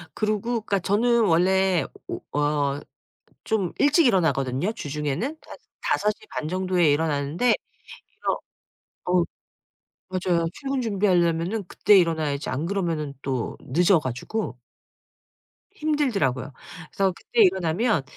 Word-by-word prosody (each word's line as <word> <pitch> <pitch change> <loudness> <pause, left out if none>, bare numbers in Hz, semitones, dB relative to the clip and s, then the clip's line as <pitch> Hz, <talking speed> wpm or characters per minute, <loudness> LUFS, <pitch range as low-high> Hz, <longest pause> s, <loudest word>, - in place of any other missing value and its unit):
그리고 215 -1 0
그러니까 230 -4 -1
저는 230 +4 +2
원래 185 +1 +3 0.2
오 - - -4 0.2
어 145 -1 +1 0.6
좀 200 -6 0
일찍 290 +1 +4
일어나거든요 160 - +1
주중에는. 150 - -3 0.2
한 - - -10 0.2
5:30 210 -6 -1
정도에 185 -3 +2
일어나는데 150 +7 +1 0.6
일어 - - -2 0.7
어 180 0 +3 0.9
맞아요 180 -2 0
출근 275 -2 -3
준비하려면은 190 -2 +1
그때 205 +1 +4
일어나야지 160 -5 +1
안 140 +6 -2
그러면은 165 -7 -2
또 130 -4 -2
늦어 175 +5 +3
가지고 130 - -4 1.1
힘들더라고요. 220 - 0 0.4
그래서 195 -1 +1
그때 235 +6 -2
일어나면 185 - +2
180 Hz, 270 characters per minute, -24 LUFS, 150-210 Hz, 1.1 s, 일찍